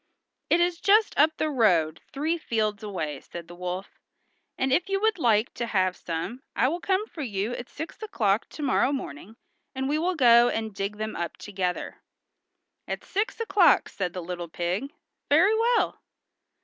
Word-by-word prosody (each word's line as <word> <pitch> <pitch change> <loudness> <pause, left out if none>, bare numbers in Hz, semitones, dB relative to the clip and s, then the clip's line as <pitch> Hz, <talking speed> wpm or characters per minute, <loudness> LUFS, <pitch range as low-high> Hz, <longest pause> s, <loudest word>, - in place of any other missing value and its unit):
"It 340 - +4
is 345 -1 +1
just 420 +2 +4
up 310 +2 +4
the 310 - 0
road 175 - +2
three 310 +4 0
fields 215 -7 -1
away," 160 -9 -4
said 170 -1 -9
the 175 - -11
wolf, 180 +2 -6 0.6
"and 265 0 +1
if 355 +5 +1
you 390 0 +1
would 435 -3 +1
like 225 -3 +2
to 235 - -3
have 185 -4 +1
some 170 +10 -5
I 255 - +3
will 340 +4 -2
come 380 +3 0
for 335 - -9
you 210 -4 -2
at 245 0 -6
six 320 +7 -8
o'clock 215 - 0
to 305 - -7
morrow 270 0 +2
morning, 215 - -6 0.4
and 265 0 -1
we 300 +2 +1
will 360 +3 0
go 240 -4 +6
and 220 -1 -3
dig 200 +1 -3
them 215 0 -4
up 170 -1 -4
together." 185 -3 -4 0.9
"At - - -4
six 425 +6 -2
o'clock!" 390 -5 +4
said 180 -3 -3
the 180 - -5
little 175 -1 -5
pig. 180 - -2 0.4
"Very 355 +9 +5
well." 465 +1 +1
235 Hz, 175 wpm, -26 LUFS, -, 0.9 s, go